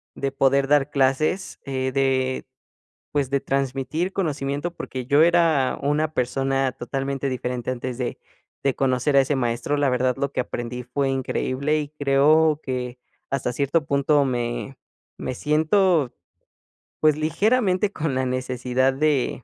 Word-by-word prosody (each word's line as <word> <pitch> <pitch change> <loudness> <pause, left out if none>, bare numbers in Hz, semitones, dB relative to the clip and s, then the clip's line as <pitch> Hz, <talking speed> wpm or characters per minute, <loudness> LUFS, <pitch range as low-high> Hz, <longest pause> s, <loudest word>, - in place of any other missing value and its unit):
de 135 0 -2
poder 135 0 +2
dar 145 0 +3
clases, 140 +7 0
eh, 130 -1 -2
de, 130 -1 0 0.7
pues, 140 -3 0
de 140 0 +1
transmitir 135 +6 -1
conocimiento, 150 -1 -2
porque 130 -2 -6
yo 140 +4 +4
era 165 -6 +3
una 150 +2 0
persona 135 +1 0
totalmente 135 +2 -3
diferente 125 -1 -3
antes 125 -1 -4
de 125 -2 -3 0.5
de 135 -2 +1
conocer 135 +1 +1
a - - +8
ese 135 +2 0
maestro, 120 +2 -1
la 145 -1 +2
verdad, 125 0 +1
lo 140 0 -1
que - - -2
aprendí 125 0 -5
fue 135 +3 -1
increíble, 135 +2 -1
y 145 -1 -4
creo 150 +2 +4
que, 125 -1 -4 0.3
hasta 130 -2 -1
cierto 140 +4 0
punto, 140 +1 +2
me 125 +1 -3 0.4
me - - -4
siento, 155 0 +2 0.9
pues, 155 -1 +4
ligeramente 195 +5 +1
con 150 -4 -2
la 130 0 0
necesidad 130 0 0
de 140 -3 0
135 Hz, 140 wpm, -23 LUFS, 130-150 Hz, 0.9 s, a